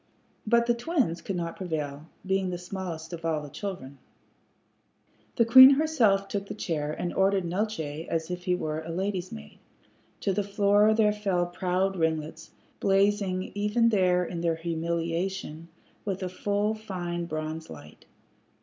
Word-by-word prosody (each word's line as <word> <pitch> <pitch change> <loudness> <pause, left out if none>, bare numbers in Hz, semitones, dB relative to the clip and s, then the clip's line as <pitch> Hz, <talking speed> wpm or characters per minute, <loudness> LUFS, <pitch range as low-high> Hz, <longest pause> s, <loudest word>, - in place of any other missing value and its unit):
But 235 +1 +4
the 240 - +3
twins 235 - -1
could 195 - -4
not 170 -1 -3
prevail, 155 -4 -4 0.2
being 190 0 0
the 180 - -3
smallest 175 -2 -6
of 165 -1 -7
all 160 -2 0
the 150 -1 -8
children. 140 -10 -6 1.4
The 230 - +4
queen 260 +4 +10
herself 235 -11 +2
took 200 0 -4
the - - -6
chair, 155 -7 -2
and 175 +3 -3
ordered 195 -1 +2
Neeltje 170 -5 -3
as 165 +1 -2
if 180 0 -5
he 180 -2 +2
were 155 -3 -3
a 160 - -9
lady's 185 +1 -2
maid. 75 0 -10 0.6
To 195 - 0
the 205 - +1
floor 205 +1 +3
there 210 -2 +3
fell 195 -4 0
proud 185 +2 -1
ringlets, 160 -1 -2 0.3
blazing 195 -1 +1
even 210 +3 +2
there 180 -4 +2
in 170 0 -5
their 165 -1 +1
humiliation 170 +1 -3 0.4
with 195 -2 -3
a 185 - -2
full 205 +3 -1
fine 180 -5 -4
bronze 155 0 -5
light. 75 0 -12
180 Hz, 155 wpm, -27 LUFS, 165-205 Hz, 1.4 s, queen